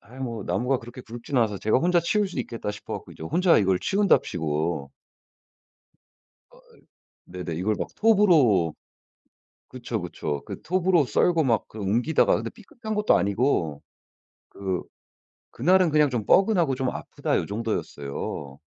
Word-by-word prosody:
아이 120 +6 -15
뭐 115 -5 -4
나무가 125 +1 0
그렇게 120 +2 -11
굵지는 120 +3 -4
않아서 105 -3 0
제가 110 +5 +2
'혼자 175 +3 +3
치울 200 +4 +1
수 160 - -7
있겠다.' 115 -3 -4
싶어 105 - -7
갖고 - - -8
이제 - - -12
혼자 175 - +3
이걸 95 -3 +2
치운답시고 80 - 0 1.6
아이. - - -20 0.7
네네. 90 -2 -6
이걸 105 +5 0
막 - - -3
톱으로 155 - +4 0.9
그쵸, - - -5
그쵸. 70 -1 -4
그 - - -8
톱으로 180 -3 +2
썰고 160 +8 +2
막 115 -5 +1
그 110 - -11
옮기다가 120 +10 +2
근데 115 +1 -3
삐끗한 220 0 -8
것도 210 0 +3
아니고 100 - 0 0.7
그 95 -2 -3 0.7
그날은 180 +5 +3
그냥 150 -1 +4
'좀 115 -4 -2
뻐근하고 180 - +3
좀 130 0 -2
아프다.' - - -3
요 - - -2
정도였어요. 75 -10 -4
120 Hz, 310 characters per minute, -25 LUFS, -, 1.6 s, 톱으로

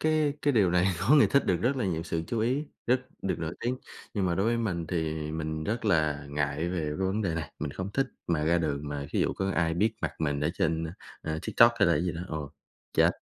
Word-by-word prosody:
cái 155 -2 +2
cái 145 - +3
điều 100 -7 +4
này, 90 +1 +3
có 120 +10 +5
người 145 - +7
thích 140 - +2
được 90 - +3
rất 130 +5 +1
là 120 - 0
nhiều 85 -3 -1
sự 80 -2 -2
chú 115 - -2
ý, 130 +7 +1 0.2
rất 125 +1 +3 0.2
được 95 - -1
nổi 80 +1 -3
tiếng. 125 +2 -1 0.4
Nhưng 100 -3 +1
mà 85 - +1
đối 95 +4 +1
với 120 0 +2
mình 90 -8 -1
thì 80 -2 -2
mình 80 0 -3
rất 115 +2 -2
là 75 -7 +2
ngại 75 +3 -1
về 90 -1 -1
cái 75 -1 -2
vấn 105 +3 0
đề 85 -5 0
này, 80 -3 -4
mình 75 -1 -3
không 95 +6 -5
thích 135 - +1 0.2
mà 80 -3 +1
ra 85 +2 +3
đường 75 -3 -2
mà 70 -1 -4
thí - - 0
dụ - - +2
có 95 0 -1
ai 80 -3 +1
biết 110 +5 +2
mặt - - -1
mình 75 -2 0
ở 75 - +1
trên, 80 -1 0
à, 80 - -5 0.3
à, 80 0 -2
TikTok 115 0 +6
hay 100 - +5
là 85 - +4
cái 75 - +1
gì 90 - 0
đó, 85 - -5
ồ, 75 -2 -4 0.4
chết - - +5
85 Hz, 265 wpm, -29 LUFS, 80-110 Hz, 0.4 s, người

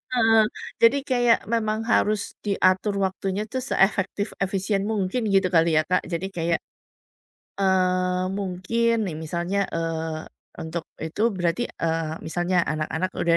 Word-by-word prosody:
Heeh, 225 -2 +5 0.4
jadi 230 +4 +6
kayak 245 -2 +4
memang 220 -1 0
harus 210 -1 +2
diatur 200 0 +2
waktunya 190 +1 -2
tuh 260 - -1
seefektif 200 -4 +1
efisien 195 +1 0
mungkin 215 +2 -1
gitu 195 -1 +3
kali 165 -2 +4
ya, 155 - +4
Kak. 180 - +1
Jadi 175 +2 -3
kayak, 170 -2 0 1.0
eee, 185 -1 +2
mungkin 200 +5 0
nih 175 - -4
misalnya, 170 +5 -2
eee, 160 -1 -3 0.3
untuk 160 +1 -4
itu 160 +6 -4
berarti, 175 +1 -1
eee, 165 -1 -2
misalnya 175 +3 -1
anak-anak 155 +4 -2
udah, 170 -1 +2
185 Hz, 130 wpm, -24 LUFS, 170-210 Hz, 1.0 s, jadi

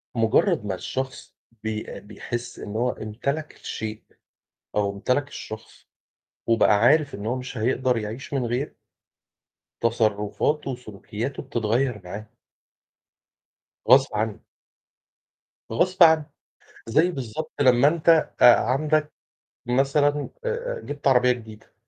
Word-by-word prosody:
مجرّد 115 - +2
ما 95 -2 -2
الشخص 130 +7 -5 0.3
بي 110 -1 -4
بيحس 120 +3 -6
إن 105 - -7
هو 125 +3 +1
امتلك 140 +8 -4
الشيء، 110 -1 -6 0.7
أو 100 -1 +1
امتلك 125 +8 0
الشخص، 110 -5 -10 0.6
وبقى 115 -2 +4
عارف 145 +5 +4
إن 100 - -7
هو 120 +3 0
مش 130 0 -6
هيقدر 125 +2 +1
يعيش 110 +6 -6
من 135 -3 0
غير 125 +5 -2 1.1
تصرفاته 115 +6 0
وسلوكياته 115 +1 -6
بتتغيّر 120 +1 -1
معاه. 100 +4 -7 1.6
غصب 135 -1 +6
عنه. 110 0 -2 1.3
غصب 185 +9 +2
عنه، 160 -2 +6 0.6
زَي 155 +10 +3
بالضبط 145 +1 -5
لمّا 130 0 +6
أنت 165 +1 -2 0.3
آآ، 120 - +10
عندك 150 +4 +1 0.5
مثلًا 140 +4 +1 0.2
آآ، 485 +1 -2
جبت 145 -1 -4
عربية 125 -1 +5
جديدة. 110 -3 -8
125 Hz, 110 wpm, -24 LUFS, 110-145 Hz, 1.6 s, آآ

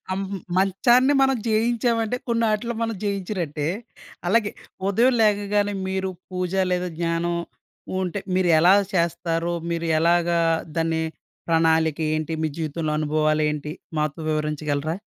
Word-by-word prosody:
ఆహ్, - - -2
మ్ 200 - -3 0.2
మంచాన్ని 240 +8 +4
మనం 270 -1 +3
జేయించామంటే 230 +1 +1
కొన్నాటిలో 230 0 0
మనం 225 -1 -1
జేయించినట్టే. 185 -7 -2 0.6
అలాగే, 205 +2 +2 0.4
ఉదయం 235 +6 +4
లేగగానే 205 -1 +2
మీరు 190 0 -2 0.2
పూజ 180 -1 -3 0.2
లేదా 180 0 0
జ్ఞానం, 170 0 0 0.7
ఉంటే 185 +2 -2 0.2
మీరెలా 175 -1 +5 0.2
చేస్తారో, 170 -1 0 0.2
మీరు 170 0 -2
ఎలాగా 170 +1 +3 0.4
దాన్ని 165 0 +1 0.5
ప్రణాళికేంటి? 160 -1 +1
మీ 160 - +1
జీవితంలో 155 0 -2
అనుభవాలేంటి? 150 -1 0 0.3
మాతో 150 +1 -1
వివరించగలరా? 150 0 -1
175 Hz, 105 wpm, -23 LUFS, 160-205 Hz, 0.7 s, మీరెలా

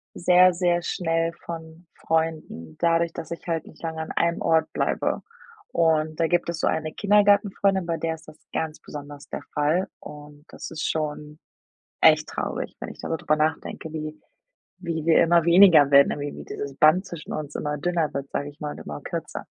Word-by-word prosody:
sehr, 180 +1 +5
sehr 175 0 +1
schnell 165 -2 -1
von 165 0 -8
Freunden, 160 - -2
dadurch, 170 0 +2
dass 165 - -8
ich 170 - -7
halt 165 -2 -2
nicht - - -16
lange 160 -1 -4
an 160 - -5
einem 170 0 +1
Ort 160 -1 +2
bleibe. - - -1 0.5
Und 155 -2 +1
da 165 - +3
gibt 175 0 +1
es 170 - -3
so - - +1
eine 155 -1 -1
Kindergartenfreundin, 200 -2 +3
bei 165 -1 -1
der 165 0 -2
ist 160 -1 -18
das 155 0 -13 0.2
ganz 160 -1 -3
besonders 145 0 -10
der - - -5
Fall 155 +6 +1
und 150 0 -12
das - - -8
ist 160 -2 -3
schon 150 -1 -4 0.6
echt - - +5
traurig, - - -4
wenn - - -6
ich - - -11
da - - -6
so 165 - -1
drüber 155 0 0
nachdenke, 160 +1 -2
wie 155 -1 -6 0.6
wie 165 -3 -4
wir 165 - +6
immer 170 0 +4
weniger 170 -5 +7
werden, 140 0 +7
äh, - - -4
wie 145 0 -6
dieses 140 -1 -6
Band 165 +6 +4
zwischen 170 -4 -8
uns 150 -1 -5
immer 150 0 -3
dünner 170 -1 0
wird, 140 0 -4
sage 145 - -2
ich 145 - -21
mal 150 -1 -4
und - - -10
immer 75 0 -7
kürzer. - - -5
160 Hz, 195 wpm, -24 LUFS, 150-170 Hz, 0.6 s, weniger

